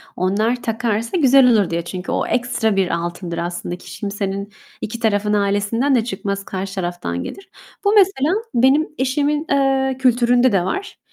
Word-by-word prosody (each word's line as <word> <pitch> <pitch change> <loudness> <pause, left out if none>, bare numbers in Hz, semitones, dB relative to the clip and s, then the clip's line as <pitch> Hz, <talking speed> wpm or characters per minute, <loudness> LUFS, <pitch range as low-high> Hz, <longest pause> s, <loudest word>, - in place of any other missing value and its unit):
onlar 215 +7 0
takarsa 225 - -1
güzel 265 -4 +6
olur 205 -6 +3
diye, 170 0 -1
çünkü 180 +1 -5
o - - -1
ekstra 240 -3 0
bir 195 -2 +2
altındır 170 0 -5
aslında. 175 0 -4
Hiç - - -11
kimsenin 200 -1 -4 0.3
2 230 +2 -5
tarafın 210 -2 +1
ailesinden 205 +6 +1
de 230 - +2
çıkmaz, 200 -2 -4
karşı 190 0 -5
taraftan 175 - -3
gelir. 390 - -9 0.3
Bu, 405 - +3
mesela, 370 -7 +3 0.2
benim 265 +6 +3
eşimin, 290 +4 0
eee, 270 -1 +2
kültüründe 245 -1 +3
de 185 -3 +1
var. 400 - -4
225 Hz, 155 wpm, -20 LUFS, 195-265 Hz, 0.3 s, güzel